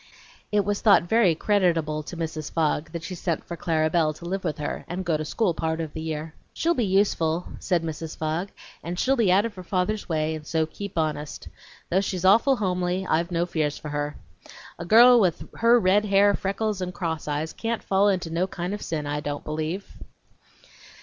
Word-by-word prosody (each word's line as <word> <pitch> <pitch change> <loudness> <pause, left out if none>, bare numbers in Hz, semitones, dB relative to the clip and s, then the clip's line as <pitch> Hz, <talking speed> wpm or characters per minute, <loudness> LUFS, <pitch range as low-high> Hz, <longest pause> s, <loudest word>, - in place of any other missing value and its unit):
It 205 -2 +2
was 205 0 -1
thought 205 -7 +6
very 185 -2 +3
creditable 165 -6 +1
to 165 +3 -8
Mrs. 155 -2 -4
Fogg 160 -1 0
that 170 -1 -6
she 185 - -5
sent 170 -2 -2
for 170 - -6
Clara 160 -2 +1
Belle 160 -1 +2
to 170 - -11
live 190 +2 -3
with 155 -4 -2
her 150 - -4
and 180 +2 -4
go 165 -3 +1
to 155 - -2
school 185 +4 0
part 160 0 -2
of 160 -2 -4
the 160 - -5
year. 160 0 -4 0.2
"She'll 340 +1 +1
be 245 -8 0
useful" 180 -4 +1
said 175 -3 0
Mrs. 160 0 -5
Fogg, 160 +5 -2 0.3
"and 175 +1 -4
she'll 265 +8 +2
be 225 -7 +3
out 200 +4 +4
of 230 - -4
her 185 - -9
father's 185 +4 -2
way, 155 -1 0
and 155 -1 -7
so 160 -1 +1
keep 195 +4 -8
honest; 155 -2 -3 0.4
though 190 +3 +3
she's 185 -2 -3
no 190 - +7
awful 230 +6 +4
hombly 180 -2 -1
I've 170 +2 +1
no 170 -1 0
fears 155 -4 -1
for 150 - -7
her. 145 0 -3 0.6
A - - -5
girl 240 +6 +8
with 185 -6 +1
her 235 +1 +5
red 200 +1 +3
hair, 200 0 +4
freckles, 200 +1 -2
and 180 -1 -4
cross 165 -3 -3
eyes 150 +2 -2
can't 230 0 -3
fall 195 +1 +3
into 180 -4 -1
no 175 +3 0
kind 180 +1 -4
of 210 - -5
sin, 155 -3 -3
I 145 +1 -2
don't 145 -1 -4
believe." 155 +5 -4
175 Hz, 210 wpm, -25 LUFS, 160-195 Hz, 0.6 s, girl